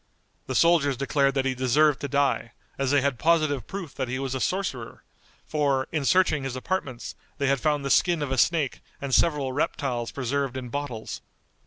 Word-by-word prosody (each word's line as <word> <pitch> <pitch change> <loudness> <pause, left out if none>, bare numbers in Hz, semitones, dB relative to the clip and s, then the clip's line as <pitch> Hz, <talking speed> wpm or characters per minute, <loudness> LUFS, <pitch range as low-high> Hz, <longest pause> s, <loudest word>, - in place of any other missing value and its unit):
The 130 - -3
soldiers 150 -4 +4
declared 140 +1 +1
that 135 -1 +1
he 130 - +1
deserved 130 +3 +3
to 145 - -2
die, 140 -4 0 0.2
as 135 -1 -1
they 145 0 +4
had 140 -2 -1
positive 155 -5 +2
proof 185 -7 -6
that 130 -2 -3
he 125 +2 -2
was 135 -1 -3
a 130 - -2
sorcerer, 140 -10 -3 0.4
for, 140 -3 0
in 155 -4 -1
searching 160 -4 +3
his 135 -1 -4
apartments, 130 -4 -3 0.2
they 140 - -1
had 140 0 +2
found 150 -2 +1
the 140 - 0
skin 175 -4 +3
of 140 - -4
a 130 - 0
snake 155 -3 +1 0.2
and 140 -1 -4
several 145 -5 +2
reptiles 130 -4 -1
preserved 135 0 -2
in 125 -2 -6
bottles. 125 -4 -5
140 Hz, 190 wpm, -26 LUFS, 130-150 Hz, 0.4 s, soldiers